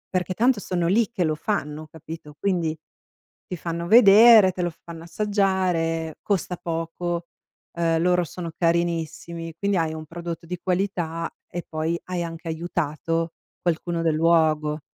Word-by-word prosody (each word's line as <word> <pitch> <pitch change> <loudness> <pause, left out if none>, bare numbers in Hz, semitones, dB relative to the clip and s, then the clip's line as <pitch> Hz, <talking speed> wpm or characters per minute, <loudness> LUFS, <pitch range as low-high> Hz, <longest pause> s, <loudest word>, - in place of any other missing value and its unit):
Perché 180 0 0
tanto 240 -1 +3
sono 175 -3 -2
lì 220 +4 +3
che 235 -6 -1
lo 155 -2 +1
fanno, 155 -3 -3
capito? 160 -1 -10
Quindi, 170 -5 0 0.7
ti 180 - -5
fanno 170 +1 -4
vedere, 215 -1 +8
te 180 - -7
lo 175 - +1
fanno 165 0 -11
assaggiare, 180 -4 0
costa 185 -3 -1
poco, 170 +1 -3 0.4
eh 165 -1 +1
loro 180 +1 +2
sono 170 +1 -6
carinissimi 170 -1 -1
quindi 200 -1 0
hai 160 -1 0
un 155 0 -7
prodotto 170 +1 -6
di 180 +1 -5
qualità 175 -3 -1 0.2
e 175 0 -5
poi 160 +2 -1
hai 180 -1 -3
anche 165 0 -6
aiutato 165 0 -2 0.3
qualcuno 170 0 -1
del 160 -2 +1
luogo. 155 -2 +2
170 Hz, 145 wpm, -24 LUFS, 165-180 Hz, 0.7 s, vedere